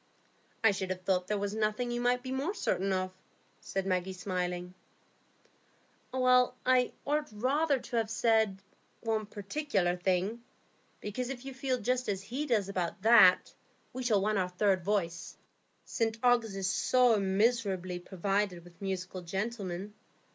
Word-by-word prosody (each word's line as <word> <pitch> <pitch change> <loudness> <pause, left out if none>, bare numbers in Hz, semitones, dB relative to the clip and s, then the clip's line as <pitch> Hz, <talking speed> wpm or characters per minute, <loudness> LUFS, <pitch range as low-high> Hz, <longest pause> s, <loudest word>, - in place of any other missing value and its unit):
"I 225 - +6
should 195 -1 -3
have 185 0 -3
thought 185 -1 +1
there 210 - 0
was 200 0 -2
nothing 220 +3 -1
you 240 0 -2
might 245 0 +1
be 260 - -5
more 280 +10 -2
certain 195 - 0
of," 185 0 -1 0.5
said 195 -1 -3
Maggie, 185 0 -1
smiling. 180 -1 -3 1.4
"I 255 0 +3
ought 300 +1 0
rather 275 +7 +1
to 240 -1 -4
have 225 -1 0
said, 220 -3 +2 0.4
one 220 -2 -1
particular 200 -3 -1
thing. 185 +5 0 0.6
Because 245 +5 -4
if 265 -1 -6
you 270 - -6
feel 260 -1 -1
just 250 +2 -1
as 195 -1 -2
he 260 +9 -4
does 215 -7 +1
about 185 -1 -3
that, 220 -5 +6 0.4
we 255 - -4
shall 220 -6 +2
want 210 0 +1
our 180 -1 0
third 185 0 +1
voice. 170 -4 -2 0.5
St 225 -1 -1
Ogg's 235 -4 +3
is 195 -1 -2
so 245 +2 +3
miserably 195 -3 +1
provided 190 0 -1
with 175 +1 -18
musical 185 -1 -4
gentlemen. 195 +1 -4
210 Hz, 145 wpm, -31 LUFS, 185-245 Hz, 1.4 s, I